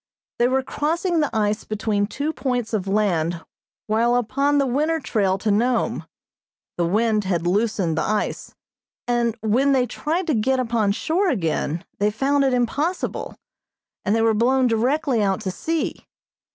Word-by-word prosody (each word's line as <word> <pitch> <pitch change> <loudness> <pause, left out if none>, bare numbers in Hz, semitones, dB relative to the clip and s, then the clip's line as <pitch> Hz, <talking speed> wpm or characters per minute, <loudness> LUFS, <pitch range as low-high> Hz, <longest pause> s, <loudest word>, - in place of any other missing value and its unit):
They 240 - +4
were 265 +1 +1
crossing 330 +6 -1
the 300 - +1
ice 210 -1 0
between 210 -1 -1
two 290 +7 -3
points 245 -6 -2
of 200 -3 -1
land 175 -5 0 0.4
while 230 +3 +2
upon 275 +5 +1
the 280 - +3
winter 300 +6 0
trail 200 -8 0
to 210 +2 -1
Nome, 235 +4 0 0.7
the 170 -1 0
wind 215 +2 +1
had 175 -3 -1
loosened 195 -3 +1
the 160 - 0
ice, 215 0 -2 0.5
and 235 -1 +1
when 250 +6 +2
they 255 -2 +3
tried 315 - -2
to 320 - 0
get 260 +3 +1
upon 230 -4 +1
shore 355 - 0
again 165 - -1
they 205 +1 +3
found 275 +6 +1
it 270 - +2
impossible, 280 +8 -1 0.7
and 205 - +1
they 225 - +2
were 225 -1 +4
blown 255 +4 +3
directly 250 +2 +1
out 195 -2 0
to 190 - -3
sea. 325 - -3
235 Hz, 160 wpm, -22 LUFS, 210-275 Hz, 0.7 s, They